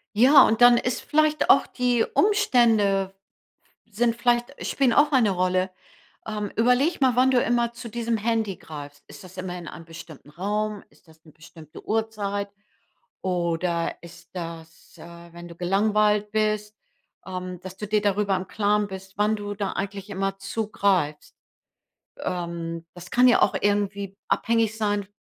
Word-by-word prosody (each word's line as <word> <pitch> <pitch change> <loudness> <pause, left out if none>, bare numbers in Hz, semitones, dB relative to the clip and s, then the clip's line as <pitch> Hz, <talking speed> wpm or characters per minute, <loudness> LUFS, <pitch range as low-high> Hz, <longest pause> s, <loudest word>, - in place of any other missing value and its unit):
Ja, 265 +5 +7
und 225 +2 +1
dann 245 0 +8
ist 250 +1 -1
vielleicht 305 0 +1
auch - - +6
die 245 -2 +1
Umstände 230 - +3 0.7
sind 230 +2 0
vielleicht– 240 +2 +1
spielen 265 -4 +1
auch 290 +3 +4
eine 245 -7 +3
Rolle. 185 0 0 0.6
Ähm, 210 -2 -4
überleg 250 +8 +2
mal, 260 -3 +3
wann 255 +1 +4
du 250 -2 +3
immer 235 0 0
zu 235 0 -9
diesem 230 0 -2
Handy 220 -3 -1
greifst. 145 -2 -10
Ist - - -13
das 185 0 -14
immer 185 -1 -5
in 175 -2 -9
einem 165 - -10
bestimmten 160 -3 -12
Raum? 210 +4 -3
Ist - - -27
das 160 +1 -22
'ne 155 - -16
bestimmte 155 0 -14
Uhrzeit? 205 -2 -2 0.7
Oder 170 -1 -1
ist 170 +1 -14
das, 165 -2 -9
äh, 170 0 -13
wenn 175 0 -10
du 170 - -12
gelangweilt 210 +3 +1
bist, 215 -1 -1 0.5
ähm, 185 -1 -6
dass 185 0 -9
du 210 - -6
dir 210 +1 +1
darüber 200 -1 +1
im 185 +1 -6
Klaren 210 0 +1
bist, 190 0 -10
wann 210 +1 +2
du 205 -1 -6
da 200 -1 -2
eigentlich 195 +1 -5
immer 195 0 -2
zugreifst? 195 -6 -1 0.8
Ähm, 170 -1 -4
das 175 0 -11
kann 250 +1 +4
ja 245 - +4
auch - - +3
irgendwie 200 -1 -1
abhängig 225 -1 +1
sein 205 -2 -1
205 Hz, 155 wpm, -24 LUFS, 180-225 Hz, 0.8 s, dann